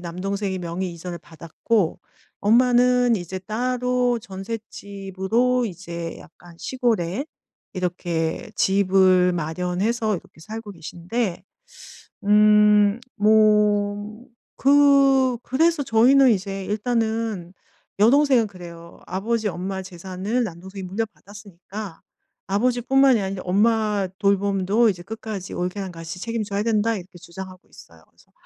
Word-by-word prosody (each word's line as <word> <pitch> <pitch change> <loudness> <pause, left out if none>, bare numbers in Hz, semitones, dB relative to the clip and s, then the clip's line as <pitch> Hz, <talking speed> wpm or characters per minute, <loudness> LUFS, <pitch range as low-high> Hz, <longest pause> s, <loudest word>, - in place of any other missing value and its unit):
남동생이 190 +3 -3
명의 175 +1 -4
이전을 170 +1 -7
받았고 165 +4 -2 0.4
엄마는 245 +2 +4
이제 185 0 -5
따로 245 +4 0
전셋집으로 200 +3 -2
이제 170 -3 -6
약간 170 +1 -16
시골에 235 - -1 0.5
이렇게 175 +1 -2
집을 185 -2 +3
마련해서 180 +7 -1
이렇게 160 - -14
살고 220 +4 -8
계신데 175 +5 -4 0.8
음 210 0 +5 0.2
뭐 210 0 +2 0.3
그 275 -2 +4
그래서 320 +3 +1
저희는 260 +3 +5
이제 195 -1 -2
일단은 220 -3 -2 0.5
여동생은 255 0 +4
그래요. 170 -3 -12
"아버지 215 +3 -1
엄마 190 +2 -4
재산을 190 +6 -3
남동생이 190 +1 -8
물려받았으니까. 205 -1 -7 0.5
아버지뿐만이 250 +4 +3
아니라 190 -1 -4
엄마 210 +1 +1
돌봄도 200 +2 +2
이제 180 -4 -3
끝까지 215 -2 -7
올케랑 185 +1 -3
같이 165 +1 -8
책임져야 215 -3 -2
된다." 225 0 +1
이렇게 185 -2 -10
주장하고 185 +2 -11
있어요. - - -17
그래서 - - -27
205 Hz, 275 characters per minute, -23 LUFS, 185-230 Hz, 0.8 s, 음